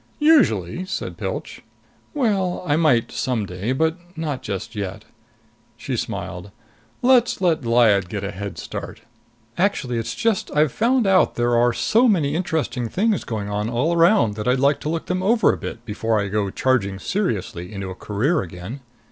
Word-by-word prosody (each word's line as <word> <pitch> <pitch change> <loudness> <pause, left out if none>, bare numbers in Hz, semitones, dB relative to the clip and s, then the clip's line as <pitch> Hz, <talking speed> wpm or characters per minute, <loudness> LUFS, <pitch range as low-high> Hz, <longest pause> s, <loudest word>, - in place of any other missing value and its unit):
"Usually," 185 - +3
said 190 - -4
Pilch. - - -5 0.5
"Well, 200 -11 0
I 145 - +3
might 150 -8 +2
some 120 -5 -1
day. 95 +6 -4
But 160 +5 +1 0.2
not 150 -5 -3
just 100 +2 -5
yet." 100 +1 -5 0.7
She - - -4
smiled. 90 +3 -5 0.5
"Let's 245 -1 +4
let 175 -5 +2
Lyad 110 -6 +4
get 100 -1 -4
a 100 - -3
head 100 0 -6
start! - - -7 0.6
Actually, 150 - 0
it's 115 0 -4
just 225 -4 0
I've 150 -2 +3
found 235 - +2
out 190 -1 +3
there 120 0 +1
are 120 +1 +4
so 230 - +3
many 160 -10 +2
interesting 150 -8 -1
things 210 - +1
going 105 -3 -4
on 105 +2 -1
all 125 +8 +1
around 170 - +4
that 105 - -4
I'd 125 +1 +3
like 140 +2 +3
to 150 - -4
look 165 0 -2
them 185 0 -1
over 220 +4 +3
a - - -4
bit 120 - -7
before 110 0 0
I 100 -1 -2
go 100 0 0
charging 100 -4 0
seriously 100 - -3
into 100 -2 -5
a - - -4
career 125 - 0
again." 90 - -7
125 Hz, 175 wpm, -22 LUFS, -, 0.7 s, Let's